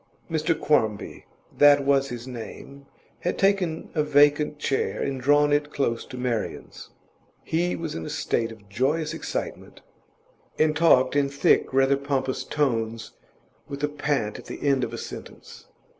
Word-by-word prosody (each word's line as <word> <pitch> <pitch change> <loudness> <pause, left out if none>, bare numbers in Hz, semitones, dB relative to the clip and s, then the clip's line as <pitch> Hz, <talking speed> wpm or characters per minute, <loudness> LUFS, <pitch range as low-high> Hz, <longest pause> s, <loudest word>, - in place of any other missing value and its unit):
Mr 160 0 0
Quarmby 110 -9 0 0.3
that 145 -1 +6
was 135 -1 +2
his 120 0 -7
name 130 +3 -9 0.3
had 180 - -2
taken 195 -5 +1
a 155 - +1
vacant 145 0 +3
chair 135 -2 -1
and 135 -2 -2
drawn 145 +2 +4
it 145 0 0
close 115 -6 -1
to 125 - -9
Marian's. 125 -3 -4 0.5
He 175 +2 0
was 165 -2 -5
in 80 - -5
a - - -6
state 115 0 -1
of 105 -3 -14
joyous 135 +9 0
excitement, - - -5 0.8
and 155 0 +2
talked 140 -5 +4
in 140 -1 +2
thick, 140 0 +2
rather 135 +1 +3
pompous 135 -2 -2
tones, 115 -6 -1 0.6
with 140 0 -7
a 150 - +2
pant 145 -7 -2
at - - -12
the - - -5
end 135 -2 +3
of 115 - -3
a 115 - -6
sentence. - - -10
140 Hz, 155 wpm, -25 LUFS, 125-150 Hz, 0.8 s, that